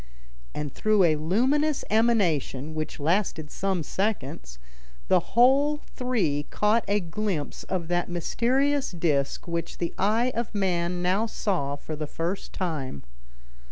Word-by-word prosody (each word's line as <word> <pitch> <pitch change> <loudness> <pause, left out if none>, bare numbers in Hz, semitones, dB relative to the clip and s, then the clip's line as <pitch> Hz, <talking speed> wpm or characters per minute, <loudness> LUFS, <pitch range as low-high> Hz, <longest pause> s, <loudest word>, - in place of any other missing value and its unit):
And 145 -2 -4
through 215 -2 +3
a 160 -3 +4
luminous 260 - +1
emanation, 175 - +2
which 155 0 -4
lasted 160 -1 0
some 190 -4 -1
seconds, 150 - -3 0.5
the - - +6 0.2
whole 280 +5 +5
three 185 - 0
caught 215 +2 +2
a 205 +1 +2
glimpse 175 -3 -3
of 180 -3 -2
that 175 0 0
mysterious 260 - +1
disc 155 -6 0
which 170 -1 -3
the 170 - -2
eye 225 +6 +2
of 230 -1 -3
man 180 -2 0
now 195 +5 +2
saw 175 -11 -1
for 155 +2 -6
the 150 0 -4
first 170 +6 -3
time. 150 - -3
180 Hz, 130 wpm, -26 LUFS, 155-220 Hz, 0.5 s, the